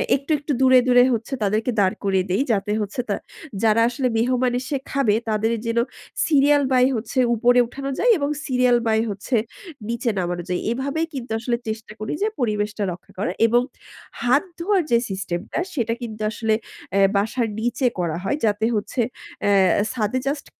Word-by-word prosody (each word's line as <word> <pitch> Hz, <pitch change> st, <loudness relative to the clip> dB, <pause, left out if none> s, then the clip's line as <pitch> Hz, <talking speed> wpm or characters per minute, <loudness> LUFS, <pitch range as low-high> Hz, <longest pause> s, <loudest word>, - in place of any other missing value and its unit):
একটু, 280 Hz, +3 st, -4 dB
একটু 295 Hz, +1 st, -4 dB
দূরে 260 Hz, -1 st, +7 dB
দূরে 245 Hz, 0 st, +6 dB
হচ্ছে 230 Hz, +4 st, -3 dB
তাদেরকে 215 Hz, +4 st, +1 dB
দাঁড় 190 Hz, -2 st, +3 dB
করিয়ে 190 Hz, -2 st, +1 dB
দেই, 195 Hz, -, +2 dB
যাতে 205 Hz, +1 st, -1 dB
হচ্ছে 210 Hz, +5 st, -3 dB
তা -, -, +1 dB, 0.5 s
যারা 225 Hz, +1 st, +4 dB
আসলে 255 Hz, +1 st, -1 dB
মেহমান 250 Hz, +2 st, +1 dB
এসে 255 Hz, +3 st, -4 dB, 0.2 s
খাবে। 270 Hz, -7 st, +2 dB, 0.2 s
তাদের 220 Hz, +1 st, +1 dB, 0.2 s
যেন 230 Hz, -, -1 dB, 0.5 s
সিরিয়াল 290 Hz, -1 st, +4 dB
বাই 255 Hz, -1 st, +5 dB
হচ্ছে 225 Hz, +3 st, -2 dB, 0.2 s
উপরে 245 Hz, +2 st, +4 dB
উঠানো 275 Hz, +2 st, -6 dB
যায় -, -, +4 dB
এবং 285 Hz, -1 st, -1 dB, 0.2 s
সিরিয়াল 250 Hz, -2 st, +3 dB
বাই 220 Hz, 0 st, +3 dB
হচ্ছে 205 Hz, +5 st, -3 dB, 0.5 s
নিচে 235 Hz, +1 st, -1 dB
নামানো 175 Hz, -1 st, -2 dB
যায়। 180 Hz, -, -1 dB
এভাবেই 280 Hz, +6 st, -1 dB
কিন্তু 245 Hz, -4 st, -6 dB
আসলে 235 Hz, +1 st, -1 dB
চেষ্টা 220 Hz, 0 st, -5 dB
করি 215 Hz, -, -3 dB
যে 420 Hz, -, +3 dB
পরিবেশটা 210 Hz, -3 st, -1 dB
রক্ষা 175 Hz, +1 st, -11 dB
করা 205 Hz, -, 0 dB, 0.2 s
এবং 240 Hz, +2 st, +3 dB, 0.6 s
হাত 255 Hz, +4 st, +3 dB, 0.2 s
ধোয়ার 380 Hz, +1 st, +2 dB
যে 235 Hz, -, +6 dB
সিস্টেম 190 Hz, -3 st, -3 dB
টা, -, -, -1 dB
সেটা 230 Hz, -5 st, 0 dB
কিন্তু 220 Hz, -3 st, -6 dB
আসলে 220 Hz, 0 st, 0 dB, 0.4 s
এ -, -, +4 dB, 0.2 s
বাসার 225 Hz, +4 st, +1 dB
নিচে 240 Hz, +3 st, 0 dB
করা 170 Hz, -2 st, -1 dB
হয়। 195 Hz, +9 st, 0 dB
যাতে 210 Hz, 0 st, +1 dB
হচ্ছে 215 Hz, +4 st, -1 dB, 0.5 s
এ -, -, +4 dB, 0.4 s
ছাদে 235 Hz, +1 st, -1 dB
জাস্ট 285 Hz, +1 st, -2 dB
235 Hz, 175 wpm, -22 LUFS, 210-260 Hz, 0.6 s, দূরে